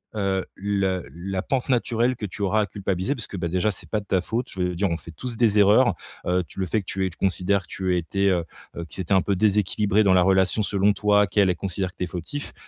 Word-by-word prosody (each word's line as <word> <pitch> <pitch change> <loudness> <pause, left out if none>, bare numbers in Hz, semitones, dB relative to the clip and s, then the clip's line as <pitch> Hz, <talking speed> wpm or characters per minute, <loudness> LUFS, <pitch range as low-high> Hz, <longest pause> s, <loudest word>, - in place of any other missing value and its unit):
heu, 95 -2 0
le 95 -2 -1
la 95 +3 -4
pente 135 -2 -1
naturelle 120 0 +1
que 115 - -5
tu 100 +1 -8
auras 100 +2 +2
à - - +1
culpabiliser. 95 +4 -2
Parce 120 -6 -6
que, 100 - -7
bah, 85 -1 -2
déjà, 90 +5 +1
c'est 100 - -6
pas 110 - 0
de 100 - -12
ta 95 -2 +1
faute, 115 +6 -3
je 95 - -9
veux 90 0 -1
dire 95 +2 0
on 85 - -1
fait 85 - -11
tous 120 +9 -6
des 110 -3 +3
erreurs. 105 +3 +5 0.3
Heu, 90 +1 +1
tu - - -11
le 95 - 0
fait 100 +5 0
que 100 - -8
tu 95 +1 -2
aies - - -1
que - - -16
tu - - -41
considères 95 +1 +1
que 90 - -19
tu 95 -1 -1
étais, 95 +3 0
heu, 90 -3 +1 0.5
qui - - -5
c'était 95 +1 -1
un 95 - +5
peu 100 - 0
déséquilibré 105 +1 +2
dans 95 -2 +4
la 90 - +5
relation 95 +3 +3
selon 100 0 +2
toi, 105 0 +3
qu'elle, 95 0 +3
elle - - -2
considère 95 +1 -3
que - - -45
tu - - -2
es - - -8
fautif. 90 - -6
95 Hz, 275 wpm, -24 LUFS, 90-105 Hz, 0.5 s, erreurs